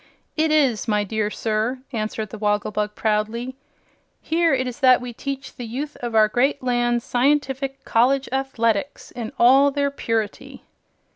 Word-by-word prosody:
"It 315 Hz, 0 st, +2 dB
is, 275 Hz, -8 st, +2 dB
my 210 Hz, -1 st, +1 dB
dear 210 Hz, +1 st, -1 dB
sir," 225 Hz, +4 st, -2 dB
answered 215 Hz, -2 st, -3 dB
the 220 Hz, -, -8 dB
Wogglebug, 210 Hz, 0 st, -1 dB
proudly. 225 Hz, +4 st, -1 dB, 0.6 s
"Here 335 Hz, +1 st, +1 dB
it 260 Hz, -1 st, +1 dB
is 250 Hz, +1 st, -6 dB
that 255 Hz, -3 st, +6 dB
we 245 Hz, -1 st, -7 dB
teach 275 Hz, +2 st, -6 dB
the 245 Hz, -, -6 dB
youth 285 Hz, +6 st, -5 dB
of 240 Hz, -2 st, -5 dB
our 215 Hz, -1 st, +6 dB
great 260 Hz, +5 st, 0 dB
land 240 Hz, -1 st, +1 dB
scientific 270 Hz, +1 st, 0 dB
College 265 Hz, +4 st, +2 dB
Athletics 265 Hz, -2 st, -1 dB
in 235 Hz, -3 st, -6 dB
all 270 Hz, +4 st, +6 dB
their 280 Hz, 0 st, -1 dB
purity." 225 Hz, -6 st, -3 dB
245 Hz, 150 wpm, -22 LUFS, 220-270 Hz, 0.6 s, that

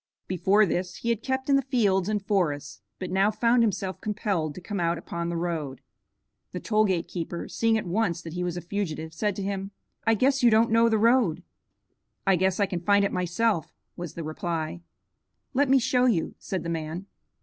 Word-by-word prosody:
Before 195 Hz, +4 st, +3 dB
this 180 Hz, 0 st, -2 dB
he 235 Hz, -, -4 dB
had 230 Hz, -2 st, 0 dB
kept 265 Hz, +1 st, -2 dB
in 280 Hz, -1 st, +5 dB
the -, -, +2 dB
fields 210 Hz, -8 st, +1 dB
and 205 Hz, -2 st, -1 dB
forests, 150 Hz, -9 st, -1 dB, 0.2 s
but 185 Hz, -, -5 dB
now 195 Hz, +2 st, +3 dB
found 235 Hz, +3 st, +3 dB
himself 195 Hz, -5 st, -1 dB
compelled 200 Hz, -8 st, -2 dB
to -, -, -7 dB
come 200 Hz, +3 st, -5 dB
out 170 Hz, 0 st, +1 dB
upon 170 Hz, 0 st, -4 dB
the 170 Hz, -, -2 dB
road. 160 Hz, -6 st, -3 dB, 0.7 s
The 180 Hz, -, -3 dB
toll 215 Hz, +1 st, +2 dB
gate 180 Hz, -4 st, 0 dB
keeper, 170 Hz, -1 st, -5 dB
seeing 225 Hz, -1 st, +1 dB
at 215 Hz, -, -3 dB
once 180 Hz, -1 st, 0 dB
that 165 Hz, -, -7 dB
he 180 Hz, 0 st, -2 dB
was 175 Hz, -1 st, -2 dB
a -, -, -4 dB
fugitive, 165 Hz, -4 st, -4 dB
said 205 Hz, +4 st, -1 dB
to 200 Hz, -, -4 dB
him, 195 Hz, 0 st, -3 dB, 0.4 s
"I 225 Hz, -, +5 dB
guess 265 Hz, +4 st, +2 dB
you 240 Hz, -, +6 dB
don't 225 Hz, +1 st, +4 dB
know 230 Hz, +1 st, +5 dB
the 220 Hz, -, +2 dB
road." 230 Hz, -6 st, +3 dB, 0.8 s
"I 195 Hz, -1 st, +5 dB
guess 190 Hz, +2 st, +1 dB
I 200 Hz, -, +4 dB
can 180 Hz, -2 st, -3 dB
find 200 Hz, +2 st, +4 dB
it -, -, -1 dB
myself," 180 Hz, 0 st, 0 dB, 0.2 s
was 175 Hz, -3 st, -7 dB
the 170 Hz, -, -5 dB
reply. 160 Hz, +1 st, -3 dB, 0.7 s
"Let 275 Hz, +1 st, +2 dB
me 270 Hz, -, +6 dB
show 250 Hz, 0 st, +2 dB
you," 190 Hz, -10 st, +1 dB
said 190 Hz, -5 st, -4 dB
the 170 Hz, -, -4 dB
man. 165 Hz, +2 st, -4 dB
190 Hz, 205 wpm, -26 LUFS, 170-220 Hz, 0.8 s, you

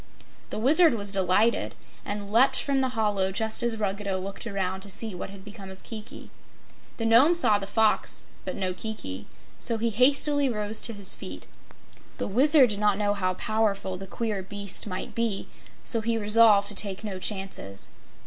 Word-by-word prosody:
The -, -, -5 dB
Wizard 295 Hz, +5 st, +4 dB
was 200 Hz, -2 st, -2 dB
delighted, 195 Hz, +4 st, +1 dB, 0.3 s
and 205 Hz, 0 st, -6 dB
leaped 255 Hz, +4 st, +4 dB
from 275 Hz, -1 st, 0 dB
the 255 Hz, -3 st, -3 dB
hollow 205 Hz, -3 st, +1 dB
just 220 Hz, +3 st, -1 dB
as 235 Hz, -2 st, -1 dB
Ruggedo 200 Hz, -2 st, -2 dB
looked 195 Hz, +5 st, -7 dB
around 190 Hz, -2 st, -3 dB
to 200 Hz, -, -12 dB
see 215 Hz, +2 st, -1 dB
what 180 Hz, -, -7 dB
had 195 Hz, 0 st, -13 dB
become 205 Hz, -2 st, -10 dB
of 190 Hz, 0 st, -13 dB
Kiki. 220 Hz, -2 st, -9 dB, 0.7 s
The 230 Hz, -, -3 dB
Nome 250 Hz, +10 st, +5 dB
saw 215 Hz, -11 st, +3 dB
the 195 Hz, -, -7 dB
Fox 220 Hz, +1 st, 0 dB, 0.2 s
but -, -, -5 dB
no 185 Hz, -2 st, -2 dB
Kiki, 140 Hz, -, -7 dB, 0.3 s
so 230 Hz, -2 st, -1 dB
he 230 Hz, +1 st, -1 dB
hastily 275 Hz, +4 st, +3 dB
rose 210 Hz, -1 st, 0 dB
to 230 Hz, -, -1 dB
his 200 Hz, -2 st, +3 dB
feet. -, -, -6 dB, 0.7 s
The -, -, -3 dB
Wizard 265 Hz, +3 st, +5 dB
did 205 Hz, -, -3 dB
not 210 Hz, -2 st, +2 dB
know 205 Hz, -1 st, 0 dB
how 185 Hz, -2 st, -2 dB
powerful 210 Hz, -3 st, -1 dB
the 195 Hz, +1 st, -9 dB
queer 215 Hz, -1 st, -3 dB
beast 200 Hz, +1 st, -5 dB
might 185 Hz, -2 st, -6 dB
be, 230 Hz, -4 st, -2 dB, 0.4 s
so 230 Hz, -3 st, +7 dB
he 230 Hz, +1 st, -1 dB
resolved 210 Hz, -1 st, +5 dB
to -, -, -2 dB
take 200 Hz, 0 st, -1 dB
no 195 Hz, -3 st, -5 dB
chances. 190 Hz, -, -3 dB
210 Hz, 180 wpm, -26 LUFS, 195-230 Hz, 0.7 s, so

